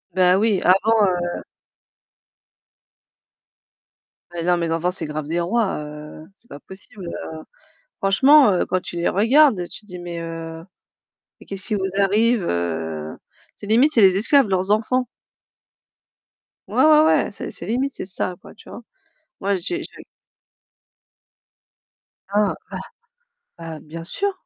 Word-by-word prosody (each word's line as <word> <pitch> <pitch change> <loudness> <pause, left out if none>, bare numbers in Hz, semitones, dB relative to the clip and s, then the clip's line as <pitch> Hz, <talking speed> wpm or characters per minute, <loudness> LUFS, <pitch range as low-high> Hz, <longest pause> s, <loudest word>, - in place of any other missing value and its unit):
Beh, 180 -1 +4
oui, 205 -1 +2
avant, 210 +3 +4
heu 175 -1 -2 2.9
Mais 170 -1 -4
non 180 0 +2
les 170 -1 -2
enfants, 165 +2 0
c'est 185 - -5
grave 150 0 -4
des 165 +3 -2
rois, 205 +4 0
heu, 150 +1 -10
c'est 235 - -22
pas 145 - -10
possible, 190 +1 -11
heu, - - -6 0.7
franchement, 265 +6 +5
heu, 180 - +1
quand 185 - 0
tu 175 - -9
les 170 - +1
regardes, 225 - +4
tu - - -8
te - - -24
dis: 180 - -8
«Mais, 175 -1 -6
heu, 165 -1 -7 0.8
mais - - -15
qu'est-ce 195 -1 -8
qui 215 - 0
vous 190 -1 -1
arrive?» 210 +2 +2
Heu, 80 - -3 0.4
c'est - - -11
limite, 250 +8 +4
c'est 230 - +4
les 190 -1 +6
esclaves, 265 +5 +4
leurs 190 +1 0
enfants. 250 +4 +1 1.6
Ouais, - - +2
ouais, 310 0 +6
ouais, - - +2
c'est - - -7
c'est - - -8
limite, 260 +4 -1
c'est - - -6
ça, 185 -1 -4
quoi, - - -14
tu - - -17
vois. 240 - -9 0.6
Moi 200 0 0
j'ai 345 - -3
j'ai - - -11 2.3
Ah, 205 0 +2 0.2
bah, - - -4 0.8
bah, 165 -1 -7
bien 165 +2 -9
sûr, 400 - -2
190 Hz, 145 wpm, -21 LUFS, 170-220 Hz, 2.9 s, les